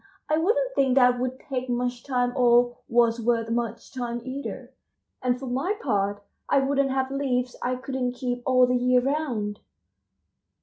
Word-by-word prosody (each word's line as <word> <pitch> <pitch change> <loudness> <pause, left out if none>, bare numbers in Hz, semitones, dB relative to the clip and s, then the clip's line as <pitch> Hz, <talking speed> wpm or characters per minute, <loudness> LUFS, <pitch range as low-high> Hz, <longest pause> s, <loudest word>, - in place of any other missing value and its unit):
I 305 - +2
wouldn't - - +1
think 265 - +2
that 250 -2 +5
would 255 +1 -3
take 255 -2 -4
much 245 0 -2
time 245 -2 0
or 245 -1 +4
was 235 0 +3
worth 230 -1 0
much 235 -1 -3
time 240 -2 -3
either, 270 +2 -6 0.5
and 250 -1 +1
for 270 - -6
my 270 +11 -1
part 205 -4 -1 0.3
I - - +4
wouldn't 275 0 +2
have 265 0 -1
leaves 255 -3 -1
I 250 +1 0
couldn't 255 -1 -3
keep 245 -1 -3
all 255 0 +5
the 250 0 +1
year 250 0 +3
round." 245 -7 -2
250 Hz, 165 wpm, -25 LUFS, 240-270 Hz, 0.5 s, that